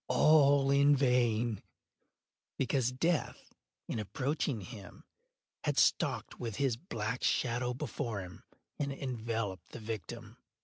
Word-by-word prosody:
All 140 -3 +5
in 140 +1 +5
vain; 120 -4 +2 1.0
because 130 -1 +1
Death, 160 +5 -1 0.3
in - - -3
approaching 130 +2 -2
him 100 0 -10 0.6
had - - 0
stalked - - +2
with 115 -4 -4
his 135 -2 +1
black 115 - -4
shadow 125 0 +1
before 120 -5 -3
him, 90 -1 -11 0.4
and 140 -1 -1
enveloped 115 -7 -4
the - - -6
victim. 115 +1 -6
125 Hz, 115 wpm, -32 LUFS, 110-140 Hz, 1.0 s, All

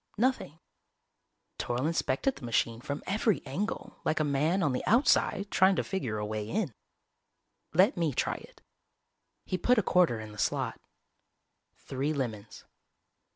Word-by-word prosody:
Nothing. 240 - 0 1.0
Toryl 120 +3 -1
inspected 165 - 0
the - - -13
machine 115 -1 0
from 140 +3 -4
every 210 -2 +1
angle, 180 +11 -4
like 155 - +1
a - - +3
man 155 +6 +1
on 145 -5 +2
the 125 - -2
outside 210 -4 +3
trying 190 +1 +5
to - - 0
figure 130 - -3
a 105 - -2
way 105 0 -4
in. 190 - -1 1.0
"Let 190 - +5
me 165 -3 +1
try - - -1
it." - - -16 0.8
He 185 - -2
put 250 0 +3
a 220 - +3
quarter 175 -13 +3
in 110 -1 -8
the 105 - -11
slot. - - -1 0.9
Three 140 +3 -3
lemons. 110 -7 -5
150 Hz, 150 wpm, -30 LUFS, 120-195 Hz, 1.0 s, trying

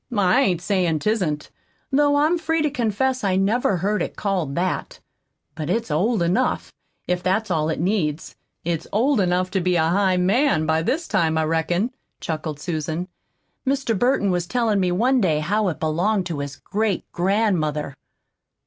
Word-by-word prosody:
I 195 +5 +4
ain't 180 -10 +1
sayin' 180 -5 +1
'tisn't, 170 -5 -1 0.4
though 285 +1 +3
I'm 310 +4 +2
free 325 0 0
to 300 - +1
confess 255 0 0
I 190 -2 +1
never 200 +1 +2
heard 205 +5 0
it - - -3
called 180 -9 -2
that. 180 +1 -2 0.5
But 155 0 -5
it's 225 -1 -1
old 190 +6 +1
enough, 185 +10 0 0.3
if 180 0 0
that's 190 +3 0
all 155 -2 +1
it 160 - -2
needs; 165 -4 -1 0.3
it's 165 -1 -2
old 250 +4 +2
enough 185 0 +1
to 190 - 0
be 180 0 +1
a 160 -1 +2
highMAN 190 - +2
by 160 0 +1
this 315 - -1
time, 165 -6 +1
I 160 - +2
reckon," 165 +8 0 0.3
chuckled 155 -2 -4
Susan. 160 +2 -3 0.5
"Mr. 270 -4 0
Burton 245 -2 +2
was 175 -1 -1
tellin' 230 -3 +1
me 180 -2 +1
one 245 +8 +2
day 165 -6 +2
how 200 +7 0
it 170 - -2
belonged 180 +6 0
to 165 -5 -4
his 140 -1 -5
great 210 +3 -2
grand 195 +1 +1
mother." 150 -2 -2
185 Hz, 170 wpm, -22 LUFS, 165-220 Hz, 0.5 s, I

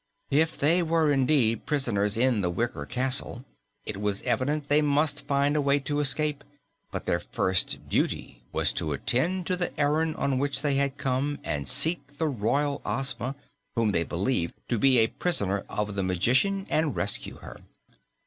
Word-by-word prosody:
If 160 +3 +2
they 165 +5 +4
were 165 -2 +2
indeed 130 -5 +2
prisoners 115 -8 +1
in 120 -3 +3
the 90 - 0
wicker 120 +8 -3
castle, 130 -1 0 0.4
it - - -5
was 100 -1 -1
evident 145 +3 -1
they 145 +1 +4
must 150 0 +1
find 140 +1 +2
a 150 - +2
way 140 0 +3
to 145 +2 -2
escape, 145 +1 +1 0.5
but - - -5
their - - +1
first 95 -1 -1
duty - - -2
was - - 0
to 75 -2 -2
attend 170 - 0
to 185 - 0
the 175 -3 -3
errand 155 +2 +1
on 135 -2 0
which 140 +1 -1
they 145 -2 +1
had 140 0 0
come 135 +3 -1
and 70 -1 -3
seek 145 +1 +2
the 160 - 0
Royal 140 +3 0
Ozma, 135 -1 -1 0.4
whom 115 -3 +2
they 85 - +1
believed 85 +1 -1
to 120 - 0
be 135 0 +4
a 110 - +5
prisoner 100 - -1
of 105 0 -2
the 100 - -2
magician, 125 - +1
and 155 -2 +1
rescue 100 - -3
her. - - -11
135 Hz, 170 wpm, -27 LUFS, 115-150 Hz, 0.5 s, a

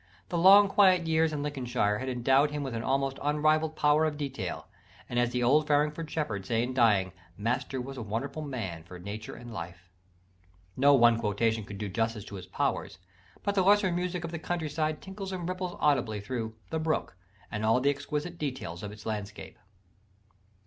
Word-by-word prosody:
The 175 - -1
long 200 +3 +8
quiet 185 -3 +4
years 160 0 +2
in 145 -2 -3
Lincolnshire 125 -8 -1
had 130 +1 -3
endowed 135 +4 +3
him 150 -1 -3
with 135 -3 -4
an 115 - -2
almost 135 +2 0
unrivalled 155 +2 +2
power 150 +1 +3
of 150 -2 -2
detail: 140 -2 -4 0.4
and, 120 - -1
as 120 -1 +2
the 125 0 -1
old 150 +5 +4
Farringford 150 +2 +1
shepherd 115 -12 -2
said 115 +4 0
in 125 +1 -3
dying, 105 -7 +3 0.3
"Master 125 +5 -1
was 135 +2 -6
a - - -4
wonderful 120 +8 -4
man 115 - -5
for 90 +2 -11
nature 100 +5 -7
and 120 -1 -10
life." 85 0 -8 0.8
No 140 +2 +6
one 120 -2 +5
quotation 110 +1 0
could 100 - -8
do 105 +1 -3
justice 110 +1 -2
to 100 - -9
his 90 -1 -9
powers: - - -2 0.5
but 200 - 0
the 195 - +3
lesser 195 0 +4
music 180 0 -2
of 165 - -4
the 170 - -4
countryside 155 -2 -2
tinkles 195 0 -6
and 180 -2 -4
ripples 185 -1 -4
audibly 125 -8 +2
through 110 +1 -4 0.2
The 160 - -1
Brook 155 - -1 0.4
and 105 - -3
all 110 +3 +4
the 140 +2 +3
exquisite 150 +4 -4
details 130 - -4
of 105 - -6
its 105 0 -12
landscape. 105 -1 -6
135 Hz, 190 wpm, -29 LUFS, 110-155 Hz, 0.8 s, long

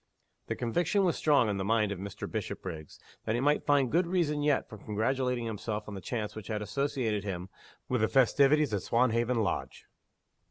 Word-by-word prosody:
The - - -2
conviction 170 - +1
was 175 - +2
strong 145 -6 +3
in 100 -2 -1
the 95 - -2
mind 105 0 +2
of 100 - -4
Mr. 100 -1 -6
Bishopriggs 80 -5 -6 0.3
that 110 - 0
he - - 0
might 145 +3 +1
find 140 -4 +3
good 170 +2 +2
reason 165 -5 0
yet 145 -1 +2
for 110 - -11
congratulating 120 +4 -1
himself 105 -1 -4
on 105 - -6
the 95 - -6
chance 105 -1 -4
which 110 -2 -8
had 110 -1 -2
associated 110 -2 -1
him 95 -2 -5 0.4
with 125 -3 0
the 110 - +4
festivities 140 +2 +4
at 100 - 0
Swanhaven 120 0 +2
Lodge. 95 - -3
115 Hz, 190 wpm, -30 LUFS, 105-140 Hz, 0.4 s, the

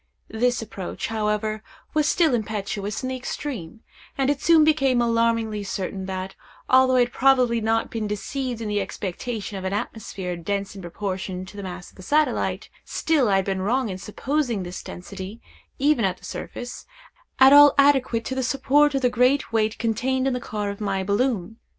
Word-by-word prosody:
This 245 +1 +1
approach, 195 -2 -5
however, 215 0 -1 0.3
was 305 -1 +2
still 325 -6 +3
impetuous 210 -1 -3
in 255 - -2
the 260 - -2
extreme; 245 - -6 0.4
and 270 0 +2
it 285 -1 -3
soon 325 -1 +6
became 275 -5 +3
alarmingly 230 -2 +1
certain 190 -1 -4
that, 190 0 -4 0.3
although 260 0 +5
I 250 - +5
had 245 0 0
probably 250 -3 +3
not 225 +1 0
been 220 -2 -2
deceived 240 +3 -3
in 220 - -3
the 205 -1 0
expectation 205 +2 -5
of - - -8
an 190 +1 -2
atmosphere 195 -3 -4
dense 200 +4 -3
in 195 - -8
proportion 185 +1 -4
to 190 - -13
the 200 - -6
mass 180 -2 -7
of - - -25
the - - -11
satellite, 300 +10 0 0.2
still 295 -8 +1
I 195 - +3
had 195 -1 +2
been 195 -1 -1
wrong 240 +4 0
in 185 -1 -5
supposing 245 0 -2
this 180 0 -6
density, 190 +4 -8 0.4
even 285 -3 +2
at 185 -2 0
the - - -14
surface, 245 0 -7 0.5
at 265 +1 +8
all 290 0 +9
adequate 265 -5 +3
to - - -3
the 260 - -1
support 280 +3 +3
of 270 - -1
the 250 - +4
great 250 +1 +2
weight 220 -1 +1
contained 255 +4 0
in 270 - +1
the 250 - -1
car 210 -3 -3
of 200 - -9
my 195 -2 -1
balloon. 215 0 0
225 Hz, 185 wpm, -24 LUFS, 200-260 Hz, 0.5 s, all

